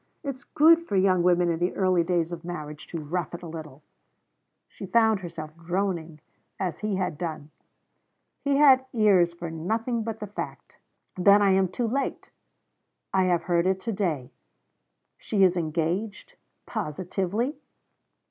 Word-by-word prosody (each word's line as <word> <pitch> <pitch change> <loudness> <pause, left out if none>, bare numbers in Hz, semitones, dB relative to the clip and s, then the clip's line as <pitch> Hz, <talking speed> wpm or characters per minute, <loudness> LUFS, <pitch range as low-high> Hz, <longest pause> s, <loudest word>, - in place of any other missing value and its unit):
It 280 -2 -2
is 260 - -19
good 325 +2 +5
for 200 - -2
young 185 -1 +3
women 175 0 +3
in 165 - -2
the 175 +1 0
early 185 -3 +2
days 170 -1 0
of 170 -1 -6
marriage 150 -4 -7
to 165 - -5
rough 170 +3 -3
it 170 - -10
a - - -6
little.' 155 -3 -9 0.8
She 195 - -9
found 220 +1 +3
herself 160 -4 -8
droning, 170 -2 -3 0.4
as 180 -5 -2
he 210 -2 -1
had 180 -5 -2
done. 155 -3 -5 0.9
He 280 -1 +2
had 270 -3 +6
ears 200 -7 +4
for 170 -1 -6
nothing 225 +9 -2
but 220 0 -4
the 210 - -4
fact. 205 - -8 0.4
'Then 200 +3 +6
I 195 - +4
am 190 0 +3
too 230 +6 -2
late!' 270 +5 -3 0.8
'I 190 -1 +3
have 175 -2 +1
heard 170 0 +1
it 190 0 +1
to 230 - -3
day.' 155 -10 -2 0.9
'She 200 -3 +1
is 185 -1 +4
engaged! 175 - -2 0.3
Positively?' 195 - -2
185 Hz, 155 wpm, -26 LUFS, 170-210 Hz, 0.9 s, had